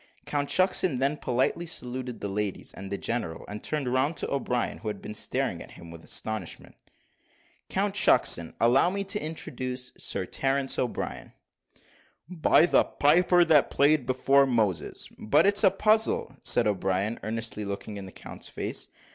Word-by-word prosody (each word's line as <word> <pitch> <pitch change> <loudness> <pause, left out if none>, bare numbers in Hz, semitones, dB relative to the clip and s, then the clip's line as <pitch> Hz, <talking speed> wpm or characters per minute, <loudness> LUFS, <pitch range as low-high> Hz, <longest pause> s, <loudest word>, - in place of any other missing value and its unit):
Count 145 -1 -2
Shucksen 185 -5 +2
then 135 +3 +1
politely 130 +6 -1
saluted 125 -5 -5
the - - -2
ladies 100 0 -3
and 95 0 -9
the 100 - -1
general, 115 -9 -3
and 105 +1 -7
turned 150 -4 -2
round 140 +5 +1
to - - -4
O'Brien, 125 -3 -1
who 110 - -8
had 105 -2 -3
been - - -8
staring 105 - -2
at - - -10
him 85 -1 -12
with 85 0 -11
astonishment. 110 -1 -4 1.0
"Count - - 0
Shucksen, 85 -1 +3
allow 120 +8 +4
me 200 +2 -2
to 210 +2 -3
introduce 130 -5 -5
Sir 95 - -3
Terence 135 +5 0
O'Brien." 125 - -4 0.9
"By 170 -1 +4
the - - +4
piper 175 +4 +3
that 155 -4 +4
played 145 -1 +2
before 135 +2 +3
Moses, 105 -10 -1
but 145 - +3
it's 200 0 +5
a - - +7
puzzle," 215 -7 +1
said 120 - +3
O'Brien, 100 +2 0
earnestly 110 0 -3
looking 100 +1 -6
in 95 -1 -7
the - - -11
count's - - -9
face. - - -4
130 Hz, 160 wpm, -27 LUFS, 105-155 Hz, 1.0 s, a